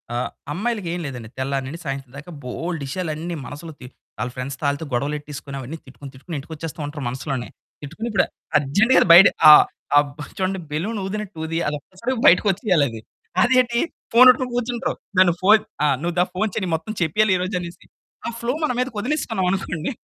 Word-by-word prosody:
ఆహ్, 120 - -1 0.2
అమ్మాయిలకేం 190 -2 -2
లేదండి. 120 -5 -7
తెల్లారి 135 0 -1
నుండి 165 +5 -7
సాయంత్రం 135 -2 -5
దాకా 150 +5 -10
బోలెడు 160 +5 -4
విషయాలన్నీ 160 +1 -3
అన్నీ 175 -1 -3
మనసులో, 160 +3 -8
తి 125 - -10 0.3
వాళ్ళ 125 - -2
ఫ్రెండ్స్‌తో 140 +4 -3
గొడవలేట్టేసుకొని, 145 +1 -4
అవన్నీ 135 +6 -7
తిట్టుకుని 135 +1 -11
తిట్టుకొని 155 +5 -8
ఇంటికొచ్చేస్తూ 160 +2 -8
ఉంటారు 145 -1 -6
మనసులోనే. 130 -1 -4 0.3
తిట్టుకుని 170 +11 -6
ఇప్పుడు 195 - +3 0.3
అర్జెంట్‌గా 200 - +4
బయట 185 +3 +10 0.2
ఆ! - - +13 0.4
ఆ! - - +8 0.4
చూడండి, 190 0 -1
బెలూన్ 200 +9 -2
ఊదినట్టు 210 -2 -5
ఉంది. 165 +1 -2
అది 150 0 -1 0.5
బయటకొచ్చేయాలి 185 - +4
అది. 110 -1 -8 0.4
అదేంటి 245 -1 +3 0.3
ఫోనొట్టుకొని 255 +1 +6
కూర్చుంటర్రు. 245 0 -1 0.2
నన్ను 180 -2 +6
ఫోను 210 +3 +6 0.4
నువ్వు 170 0 -2
దా - - +6
ఫోను 215 +3 0
చెయ్యి, 185 -5 -1
మొత్తం 215 +7 -5
చెప్పేయాలి 190 +5 +3
ఈరోజు 185 +1 -2
అనేసి. 170 0 -9 0.4
ఆ - - 0
ఫ్లో 240 +2 -1
మన 305 - +2
మీదకి 250 -3 -2
వదిలేసుకున్నామనుకోండి. 195 - -1
170 Hz, 155 wpm, -22 LUFS, 145-210 Hz, 0.5 s, ఆ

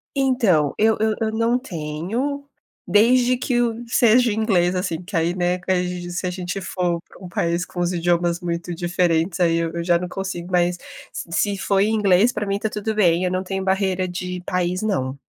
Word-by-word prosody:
Então, 230 - +2
eu 220 +1 +3
eu 220 0 +1
eu 220 -1 0
não 230 +2 +1
tenho, 220 - -4 0.4
desde 245 +4 +4
que 245 -1 0
o 235 0 -1
seja 235 +1 +4
o - - 0
inglês, 190 -5 +1
assim, 180 -3 -2
que 185 +2 -8
aí, 165 +1 +1
né, 180 0 0
que 180 -1 -2
se 180 +1 -3
a - - 0
gente 180 +1 -4
for 180 -2 -1
pra - - -17
um 180 - -8
país 170 0 -1
com 180 - -8
os 175 +1 0
idiomas 175 0 +1
muito 170 0 -3
diferentes, 175 0 0
aí 170 -2 +3
eu 165 -1 -1
eu 170 - -3
já 175 -1 +4
não 180 +1 -5
consigo, 185 -2 -5
mas 175 0 +2 0.4
se 170 - -7
se 200 +3 +1
foi 195 +1 +2
em 220 +1 +1
inglês, 205 +2 +4
pra 210 - -2
mim 200 0 -1
está 215 +2 -2
tudo 210 +1 -3
bem, 175 -4 +3
eu 180 - 0
não 185 - 0
tenho 190 0 -3
barreira 190 -1 0
de 180 0 -5
país 180 +1 -1
não. 140 -11 -1
185 Hz, 210 wpm, -22 LUFS, 175-215 Hz, 0.4 s, desde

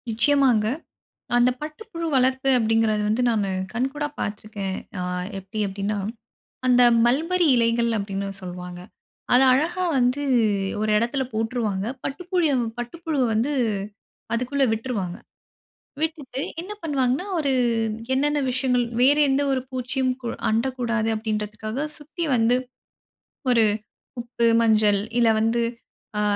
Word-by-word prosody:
நிச்சயமாங்க. 240 -1 +3 0.7
அந்த 245 +1 +5
பட்டுப்புழு 335 +3 -6
வளர்ப்பு 260 +1 +2
அப்படிங்கிறது 225 -2 +2
வந்து 220 +4 +1
நானு 210 -4 0 0.2
கண்கூடா 270 +5 -1
பார்த்துருக்கேன். 205 -2 -4 0.2
ஆ - - -2 0.4
எப்டி 195 +3 -7
அப்டின்னா, 200 +2 -3 0.7
அந்த 250 -1 +5 0.2
"மல்பெரி 330 +8 +2
இலைகள்." 235 0 +2
அப்டின்னு 200 0 -3
சொல்வாங்க. 180 -1 -7 0.5
அத 250 - +7
அழகா 345 +7 0
வந்து 250 +3 +1 0.6
ஒரு 215 0 0
எடத்துல 240 +4 0
போட்டுருவாங்க, 220 -3 -1 0.2
பட்டுப்புழிய 350 +1 0 0.3
பட்டுப்புழுவ 300 +4 -2
வந்து 235 +7 +1 0.8
அதுக்குள்ள 260 +4 +1
விட்ருவாங்க. 220 -6 -3 0.9
விட்டுட்டு 300 -5 -3 0.2
என்ன 370 +4 -8
பண்ணுவாங்கன்னா, 275 0 0
ஒரு 285 -3 +1 0.6
என்னன்ன 295 +2 +1
விஷயங்கள் 250 -1 +1 0.2
வேறு 285 +4 +5
எந்த 270 +1 +2
ஒரு 260 -1 +1
பூச்சியும் 255 +1 -1 0.4
அண்டக்கூடாது 235 -1 0
அப்படின்றதுக்காக, 215 +4 -3
சுத்தி 310 +3 -6
வந்து 230 +1 +3 1.0
ஒரு 230 -2 +5 0.6
உப்பு, 235 0 -2 0.2
மஞ்சள் 215 -3 +4 0.2
இல்ல 235 -1 +5
வந்து, 225 +2 +1 0.6
ஆ - - +2
245 Hz, 110 wpm, -24 LUFS, 215-275 Hz, 1.0 s, அத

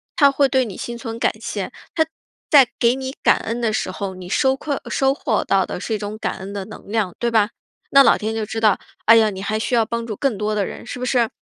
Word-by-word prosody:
他 280 -2 +6
会 275 0 +2
对 260 -1 +2
你 205 -5 -7
心 240 0 -6
存 230 -1 -6
感 - - +2
谢， 210 -1 -4 0.2
他 320 -1 +2 0.4
在 280 -5 +7
给 235 +1 +4
你 265 0 -5
感 - - +4
恩 230 +2 -4
的 230 -2 +1
时 200 - -2
候， 190 0 -5
你 185 -1 -9
收 265 +7 +2
馈 290 +1 -3
呃 - - -9
收 270 0 +2
获 250 -6 -1
到 195 -1 +3
的 - - -5
是 220 - -3
一 - - +1
种 205 +1 -5
感 - - -3
恩 190 +1 -7
的 200 -2 -4
能 215 - -12
量， 210 -5 0
对 240 - +1
吧？ 220 -3 +3 0.4
那 275 - +8
老 - - +5
天 215 +1 -3
就 225 -1 -2
知 225 +2 -4
道， 215 -3 +3 0.3
哎 225 - +8
呀， 220 -1 +4
你 190 -2 -6
还 215 +1 -1
需 240 - 0
要 230 -1 +3
帮 235 +1 -4
助 215 - -4
更 250 -2 -1
多 210 0 -1
的 205 -2 +1
人， - - -8
是 - - -6
不 250 - -3
是？ 245 -3 +2
225 Hz, 295 characters per minute, -21 LUFS, 210-250 Hz, 0.4 s, 那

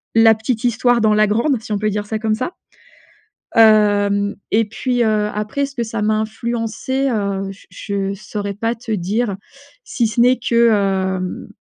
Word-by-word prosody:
la 225 0 +6
petite 220 +2 -3
histoire 240 0 +2
dans 215 -1 +3
la 215 0 +4
grande, 230 +4 +1
si 225 - -10
on 205 - -1
peut 215 +1 0
dire 205 0 -3
ça 220 +1 -3
comme 220 -1 0
ça. 255 +9 -3 1.0
Hem 205 -2 +4 0.2
et 225 +2 +3
puis, 245 +3 -1
heu, 215 -2 +1
après 215 +7 -2
ce 275 0 -11
que 235 - -1
ça 225 -1 -4
m'a 215 +1 +2
influencé, 235 +4 -2
heu, 200 -4 -2
j 195 - -15
je 195 +1 -3
saurais 200 0 -5
pas 230 +3 -1
te 230 0 -8
dire 205 +2 -1 0.5
si 235 -4 0
ce 215 +2 -3
n'est 250 +1 +5
que, 235 -1 +3
hem. 190 -3 -1
215 Hz, 180 wpm, -19 LUFS, 205-235 Hz, 1.0 s, la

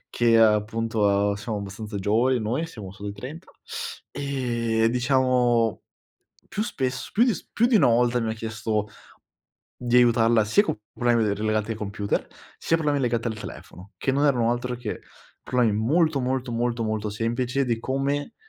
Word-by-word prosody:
che 115 -1 +3
appunto, 110 +1 +2
uhm, 100 0 +2
siamo 105 +1 -4
abbastanza 100 +2 -6
giovani 115 +6 +2
noi, 120 +10 -1
siamo 105 -12 -9
solo 100 +1 -7
ai 100 - -6
30 135 - -9 0.6
e 120 -5 0
diciamo 125 -2 +2 0.7
più 210 - -2
spesso 130 - -3
più 230 - +4
s - - -8
più 235 - +3
di 245 -2 +4
una - - +5
volta 120 +1 +3
mi 115 -1 -1
ha - - -3
chiesto 110 -1 -2 0.9
di 120 0 0
aiutarla 115 -2 +4
sia 110 - +4
co 110 - -2
problemi 120 -2 +2
de 100 -1 +1
relegati 110 +1 -1
ai - - -6
computer, 100 -1 -2 0.3
sia 165 - +1
con 165 - -4
problemi 145 -1 +2
legati 120 -2 0
al 110 -1 -5
telefono, 95 -2 -10
che 135 - 0
non 140 +2 +2
erano 120 -5 +2
altro 125 +1 -3
che 115 -3 -5 0.4
problemi 125 -4 +2
molto, 145 +7 +2
molto, 130 0 -2
molto, 115 0 -1
molto 110 -1 -2
semplici 120 +5 -1
di 120 -3 0
come 140 - -2
115 Hz, 170 wpm, -25 LUFS, 110-130 Hz, 0.9 s, una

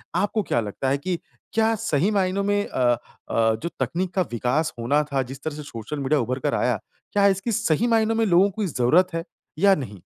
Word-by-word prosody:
आपको 205 +4 +1
क्या 120 - 0
लगता 110 +5 -3
है 140 - +2
कि 175 +5 -2 0.4
क्या 225 0 +3
सही 195 -3 +1
मायनों 195 -1 +1
में 205 0 +1
अ - - -5 0.5
अ, 115 -1 +2
जो 170 - -1
तकनीक 175 +8 -1
का 190 - +3
विकास 125 +7 0
होना 145 +6 +2
था 135 -1 +2
जिस 135 - -13
तरह 155 -2 -3
से 150 - -7
सोशल 140 +1 -6
मीडिया 140 +2 +1
उभर 130 +3 -2
कर 145 +2 -1
आया, 125 -4 +1 0.3
क्या 200 -1 +5
इसकी 195 +4 0
सही 200 +2 +1
मायनों 225 -1 +2
में 225 0 +2
लोगों 190 0 +5
की 210 - +1
ज़रूरत 165 +6 +3
है 165 - -2 0.4
या 195 +1 +6
नहीं? 105 - -7
165 Hz, 215 wpm, -24 LUFS, 130-200 Hz, 0.5 s, या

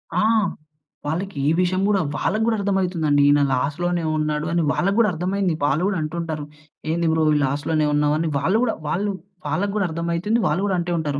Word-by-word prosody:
ఆ! - - +3 0.8
వాళ్ళకే 160 0 -3 0.2
విషయం 185 +1 +1
గూడా, 205 -2 +2 0.2
వాళ్ళకు 215 +2 0
గూడా 225 - +2
అర్థమయితుందండి, 180 -7 +1
ఈన 145 - +4
లాస్‌లోనే 165 +7 -1
ఉన్నాడు 150 0 -1
అని 170 0 +1
వాళ్ళకు 195 +3 0
గూడా 215 -3 +4
అర్థమైంది. 185 +2 -1
వాళ్ళు 150 +4 +1
గూడా 200 -3 -1
అంటుంటారు, 155 -1 -4 0.5
"ఏంది 170 0 0
బ్రో 160 0 +2
ఈ - - +2
లాస్‌లోనే 145 +3 0
ఉన్నావు?" 150 0 +2
అని 165 +1 -1
వాళ్ళు 195 +9 +2
గూడా 230 - +1 0.2
వాళ్ళు 200 +5 0 0.4
వాళ్ళకు 200 +2 -1
గూడర్థమయితుంది. 170 +3 0
వాళ్ళు 165 +5 +1
గూడంటే 180 -3 -1
ఉంటారు, 145 -3 -2
170 Hz, 165 wpm, -22 LUFS, 150-190 Hz, 0.8 s, ఈన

